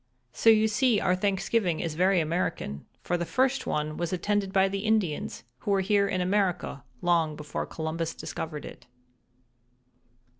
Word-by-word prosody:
"So 225 Hz, -, +4 dB
you 220 Hz, 0 st, +6 dB
see 220 Hz, +1 st, +2 dB
our 180 Hz, -1 st, +2 dB
Thanksgiving 195 Hz, -2 st, 0 dB
is 165 Hz, -2 st, -2 dB
very 185 Hz, +3 st, +3 dB
American, 155 Hz, -, -2 dB, 0.2 s
for 175 Hz, -, 0 dB
the 170 Hz, -, -2 dB
first 260 Hz, +8 st, +1 dB
one 150 Hz, 0 st, -1 dB
was 175 Hz, -1 st, -2 dB
attended 200 Hz, +1 st, 0 dB
by 190 Hz, 0 st, +4 dB
the 195 Hz, +1 st, -3 dB
Indians, 210 Hz, -, 0 dB, 0.2 s
who -, -, -5 dB
were 195 Hz, -1 st, +3 dB
here 200 Hz, +1 st, +2 dB
in 185 Hz, -2 st, -1 dB
America 180 Hz, -7 st, 0 dB, 0.2 s
long 165 Hz, -3 st, +2 dB
before 150 Hz, 0 st, -5 dB
Columbus 160 Hz, +1 st, -3 dB
discovered 155 Hz, -2 st, -5 dB
it." -, -, -11 dB
185 Hz, 155 wpm, -28 LUFS, 165-205 Hz, 0.2 s, you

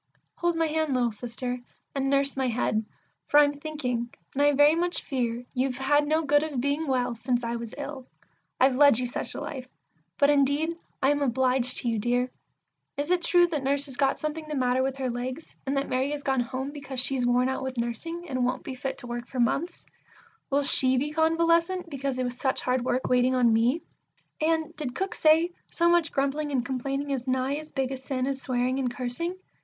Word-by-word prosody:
Hold 345 Hz, -1 st, +1 dB
my 330 Hz, 0 st, +2 dB
hand, 315 Hz, -3 st, 0 dB
little 240 Hz, -2 st, +2 dB
Sister, 245 Hz, +3 st, -4 dB, 0.3 s
and 270 Hz, -1 st, 0 dB
nurse 275 Hz, 0 st, +2 dB
my 265 Hz, -1 st, 0 dB
head, 225 Hz, -2 st, 0 dB, 0.4 s
for 295 Hz, -, +6 dB
I'm 290 Hz, -1 st, +3 dB
thinking, 250 Hz, -6 st, -3 dB, 0.2 s
and 280 Hz, -, 0 dB
I 290 Hz, 0 st, +5 dB
very 290 Hz, +2 st, +6 dB
much 345 Hz, +1 st, 0 dB
fear 245 Hz, -2 st, -2 dB
You've 255 Hz, -1 st, -1 dB
had 290 Hz, +2 st, +2 dB
no 315 Hz, +2 st, +2 dB
good 290 Hz, 0 st, +4 dB
of 300 Hz, -4 st, -3 dB
being 285 Hz, +4 st, 0 dB
well 250 Hz, -2 st, +1 dB
since 240 Hz, +1 st, -1 dB
I 235 Hz, 0 st, -2 dB
was 230 Hz, -1 st, -7 dB
ill; 280 Hz, -3 st, -6 dB, 0.5 s
I've 260 Hz, 0 st, +4 dB
led 285 Hz, -4 st, +6 dB
you 250 Hz, -, -1 dB
such 245 Hz, -, -4 dB
a -, -, -4 dB
life; 260 Hz, -4 st, -6 dB, 0.5 s
but 285 Hz, +1 st, +5 dB
indeed 290 Hz, +4 st, +2 dB, 0.3 s
I 270 Hz, -, +5 dB
am 290 Hz, 0 st, 0 dB
obliged 255 Hz, -1 st, +2 dB
to -, -, -2 dB
you, 225 Hz, -2 st, +1 dB
dear! 245 Hz, +3 st, 0 dB, 0.7 s
Is 290 Hz, +4 st, -2 dB
it 360 Hz, -1 st, +3 dB
true 350 Hz, 0 st, +5 dB
that 305 Hz, -4 st, -2 dB
Nurse 280 Hz, +1 st, +2 dB
has 270 Hz, -3 st, -8 dB
got 270 Hz, +1 st, +2 dB
something 305 Hz, +1 st, -4 dB
the 305 Hz, -, -4 dB
matter 255 Hz, -1 st, +2 dB
with 270 Hz, 0 st, -1 dB
her 260 Hz, -2 st, -1 dB
legs, 255 Hz, +6 st, -5 dB
and 275 Hz, +1 st, 0 dB
that 275 Hz, -, 0 dB
Mary 260 Hz, +2 st, 0 dB
has 290 Hz, -1 st, -5 dB
gone 265 Hz, -1 st, +1 dB
home 260 Hz, +3 st, -3 dB
because 275 Hz, -3 st, -5 dB
she's 255 Hz, 0 st, +2 dB
worn 245 Hz, +1 st, +3 dB
out 265 Hz, -, -2 dB
with 260 Hz, -1 st, -4 dB
nursing, 330 Hz, +10 st, -4 dB
And 255 Hz, -4 st, -1 dB
won't 250 Hz, +1 st, -1 dB
be 270 Hz, -, -5 dB
fit 265 Hz, +1 st, -4 dB
to 265 Hz, -, -4 dB
work 240 Hz, 0 st, -5 dB
for 260 Hz, -, -6 dB
months? 285 Hz, +9 st, 0 dB, 0.6 s
(will 285 Hz, +1 st, +2 dB
she 260 Hz, -1 st, +5 dB
be 290 Hz, +4 st, -1 dB
convalescent, 335 Hz, +2 st, +2 dB
because 275 Hz, -2 st, -2 dB
it 255 Hz, -, 0 dB
was 245 Hz, -1 st, -2 dB
such 265 Hz, -1 st, 0 dB
hard 250 Hz, -1 st, 0 dB
work 255 Hz, +1 st, 0 dB
waiting 250 Hz, +1 st, +3 dB
on 240 Hz, -3 st, +4 dB
me?) 240 Hz, +8 st, +2 dB, 0.6 s
and 320 Hz, 0 st, 0 dB
did 275 Hz, -5 st, -5 dB
Cook 385 Hz, +2 st, -2 dB
say, 320 Hz, +2 st, +4 dB, 0.2 s
"So 340 Hz, -, +1 dB
much 345 Hz, -2 st, +3 dB
grumbling 280 Hz, +2 st, -1 dB
and 255 Hz, -3 st, 0 dB
complaining 275 Hz, +2 st, -3 dB
is 260 Hz, -2 st, -3 dB
nigh 260 Hz, +2 st, 0 dB
as 310 Hz, 0 st, -9 dB
big 270 Hz, -2 st, -1 dB
a 265 Hz, -, -3 dB
sin 260 Hz, -1 st, -3 dB
as 270 Hz, 0 st, -3 dB
swearing 255 Hz, +1 st, 0 dB
and 255 Hz, -2 st, 0 dB
cursing"? 255 Hz, +9 st, -3 dB
270 Hz, 215 wpm, -27 LUFS, 250-295 Hz, 0.7 s, for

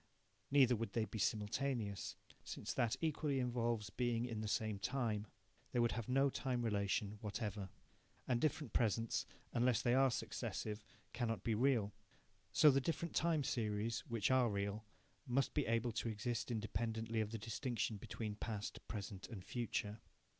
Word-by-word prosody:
(Neither 135 Hz, -3 st, +6 dB
would 115 Hz, +1 st, -3 dB
they 115 Hz, -2 st, +2 dB
be 110 Hz, +2 st, -6 dB
simultaneous, 110 Hz, 0 st, 0 dB, 0.3 s
since -, -, -4 dB
that 115 Hz, -2 st, +2 dB
equally 150 Hz, -3 st, +1 dB
involves 120 Hz, -4 st, 0 dB
being 120 Hz, 0 st, +1 dB
in 115 Hz, -3 st, -3 dB
the 110 Hz, -, -2 dB
same 110 Hz, -1 st, 0 dB
time. 110 Hz, -3 st, 0 dB, 0.5 s
They 125 Hz, -, +2 dB
would 120 Hz, -1 st, +4 dB
have 115 Hz, +2 st, -3 dB
no 135 Hz, +2 st, +4 dB
time 125 Hz, -3 st, -1 dB
relation 100 Hz, 0 st, 0 dB
whatever.) 105 Hz, -2 st, -3 dB, 0.6 s
And 120 Hz, -1 st, +2 dB
different 150 Hz, -5 st, 0 dB
presents, 115 Hz, 0 st, +1 dB, 0.3 s
unless 120 Hz, -1 st, +3 dB
they 120 Hz, -, +4 dB
are 135 Hz, +1 st, +6 dB
successive, 105 Hz, -3 st, -3 dB, 0.3 s
cannot 115 Hz, -5 st, -1 dB
be 115 Hz, -, +1 dB
real. 115 Hz, -3 st, +3 dB, 0.6 s
So 150 Hz, +9 st, +8 dB
the 135 Hz, 0 st, +3 dB
different 165 Hz, +3 st, -1 dB
time 160 Hz, -3 st, +3 dB
series, 110 Hz, -2 st, 0 dB
which 115 Hz, 0 st, +1 dB
are 130 Hz, -2 st, +5 dB
real, 100 Hz, +1 st, -2 dB, 0.4 s
must 130 Hz, +1 st, +2 dB
be -, -, +1 dB
able 115 Hz, +1 st, +2 dB
to 115 Hz, -, -1 dB
exist 115 Hz, +3 st, -2 dB
independently 110 Hz, 0 st, -1 dB
of 105 Hz, -, -1 dB
the 115 Hz, -, -3 dB
distinction 115 Hz, 0 st, -2 dB
between 105 Hz, +2 st, -4 dB
past, 105 Hz, -1 st, -4 dB
present, 100 Hz, -2 st, -5 dB
and 95 Hz, -5 st, -7 dB
future. 110 Hz, -3 st, -2 dB
115 Hz, 155 wpm, -39 LUFS, 105-125 Hz, 0.6 s, So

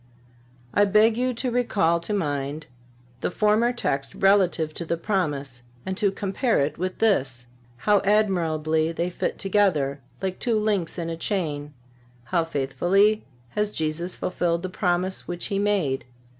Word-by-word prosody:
(373) 205 Hz, -, +3 dB
I -, -, +7 dB
beg 215 Hz, +2 st, +5 dB
you 255 Hz, +2 st, +1 dB
to 250 Hz, +1 st, -2 dB
recall 200 Hz, -9 st, +2 dB
to 170 Hz, +4 st, -6 dB
mind 145 Hz, -5 st, -2 dB, 0.5 s
the -, -, -1 dB
former 215 Hz, +5 st, +2 dB
text 135 Hz, -, -2 dB
relative 185 Hz, -5 st, +3 dB
to 170 Hz, -, -5 dB
the 170 Hz, 0 st, -2 dB
Promise 145 Hz, -, -2 dB, 0.2 s
and 190 Hz, -, -2 dB
to 205 Hz, -1 st, +1 dB
compare 200 Hz, +5 st, 0 dB
it 145 Hz, +2 st, -1 dB
with 185 Hz, +1 st, -2 dB
this. 135 Hz, -, +1 dB, 0.3 s
How 205 Hz, +11 st, +3 dB
admirably 165 Hz, -6 st, +1 dB
they 170 Hz, +2 st, -2 dB
fit -, -, -2 dB
together, 170 Hz, -9 st, +1 dB, 0.2 s
like 190 Hz, -1 st, -3 dB
two 235 Hz, -3 st, +1 dB
links 205 Hz, -6 st, 0 dB
in 165 Hz, -1 st, -3 dB
a -, -, -3 dB
chain! 150 Hz, -6 st, -2 dB, 0.5 s
How 165 Hz, +8 st, +1 dB
faithfully 175 Hz, +8 st, +2 dB, 0.2 s
has 210 Hz, -, -1 dB
Jesus 165 Hz, 0 st, -2 dB
fulfilled 170 Hz, -1 st, -1 dB
the 185 Hz, -, -3 dB
Promise 185 Hz, 0 st, -1 dB
which 175 Hz, 0 st, -4 dB
He 200 Hz, -2 st, -1 dB
made! 190 Hz, -10 st, 0 dB
180 Hz, 155 wpm, -25 LUFS, 155-205 Hz, 0.5 s, I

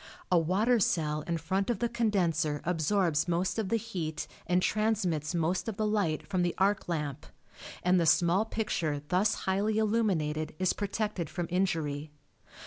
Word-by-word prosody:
A 180 Hz, -, +6 dB
water 205 Hz, +9 st, +2 dB
cell 155 Hz, -6 st, +1 dB
in 170 Hz, -1 st, 0 dB
front 190 Hz, +6 st, -1 dB
of 235 Hz, -, +1 dB
the 235 Hz, -, 0 dB
condenser 180 Hz, -10 st, 0 dB
absorbs 170 Hz, -1 st, +1 dB
most 175 Hz, +5 st, 0 dB
of 205 Hz, -4 st, -2 dB
the 230 Hz, -, +2 dB
heat 180 Hz, -9 st, -4 dB, 0.2 s
and 180 Hz, +1 st, +3 dB
transmits 185 Hz, -7 st, 0 dB
most 170 Hz, +4 st, 0 dB
of 210 Hz, -, -6 dB
the 215 Hz, -, 0 dB
light 205 Hz, -7 st, 0 dB
from 185 Hz, -2 st, -1 dB
the 175 Hz, -1 st, 0 dB
arc 195 Hz, 0 st, +1 dB
lamp, 150 Hz, -5 st, -3 dB, 0.6 s
and 180 Hz, 0 st, +4 dB
the 165 Hz, -, +2 dB
small 175 Hz, +5 st, +4 dB
picture 165 Hz, -10 st, -2 dB
thus 185 Hz, +4 st, +2 dB
highly 200 Hz, +3 st, +1 dB
illuminated 185 Hz, -10 st, 0 dB
is 185 Hz, +1 st, +1 dB
protected 205 Hz, -5 st, -2 dB
from 175 Hz, -2 st, -3 dB
injury. 160 Hz, -5 st, -1 dB
180 Hz, 160 wpm, -30 LUFS, 160-210 Hz, 0.6 s, A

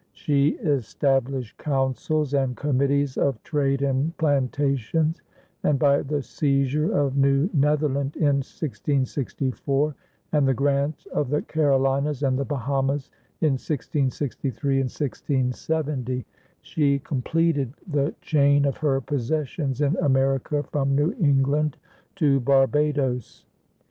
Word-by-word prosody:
She 145 Hz, 0 st, +1 dB
established 135 Hz, -3 st, 0 dB
councils 140 Hz, +1 st, -1 dB
and 135 Hz, -3 st, 0 dB
committees 140 Hz, 0 st, +1 dB
of 135 Hz, -5 st, 0 dB
trade 140 Hz, -3 st, 0 dB
and 140 Hz, +5 st, 0 dB
plantations, 145 Hz, +1 st, 0 dB, 0.4 s
and, 150 Hz, -, +2 dB
by 140 Hz, +1 st, +3 dB
the 145 Hz, 0 st, -2 dB
seizure 140 Hz, +2 st, 0 dB
of 140 Hz, -1 st, +1 dB
New 140 Hz, +6 st, +3 dB
Netherland 145 Hz, -1 st, +1 dB
in 145 Hz, -3 st, +2 dB
1664 140 Hz, 0 st, -2 dB, 0.4 s
and 145 Hz, -3 st, +3 dB
the 135 Hz, -, +2 dB
grant 140 Hz, +3 st, 0 dB
of 145 Hz, -, 0 dB
the 150 Hz, +2 st, 0 dB
Carolinas 140 Hz, -1 st, +1 dB
and 130 Hz, -2 st, +2 dB
the 140 Hz, -, -1 dB
Bahamas 135 Hz, 0 st, -1 dB, 0.3 s
in 155 Hz, -3 st, +3 dB
1663 135 Hz, -1 st, -2 dB
and 135 Hz, -1 st, 0 dB
1670, 130 Hz, -1 st, -2 dB, 0.4 s
she 140 Hz, -3 st, +1 dB
completed 145 Hz, 0 st, 0 dB
the 150 Hz, -4 st, -1 dB
chain 145 Hz, -2 st, +3 dB
of 140 Hz, -, -1 dB
her 140 Hz, -3 st, +1 dB
possessions 145 Hz, +1 st, -2 dB
in 145 Hz, +3 st, +2 dB
America 135 Hz, +1 st, +1 dB
from 140 Hz, -2 st, -1 dB
New 150 Hz, +7 st, +2 dB
England 145 Hz, -1 st, +2 dB, 0.4 s
to 145 Hz, -7 st, +3 dB
Barbados. 135 Hz, -1 st, +1 dB
140 Hz, 115 wpm, -24 LUFS, 135-150 Hz, 0.4 s, by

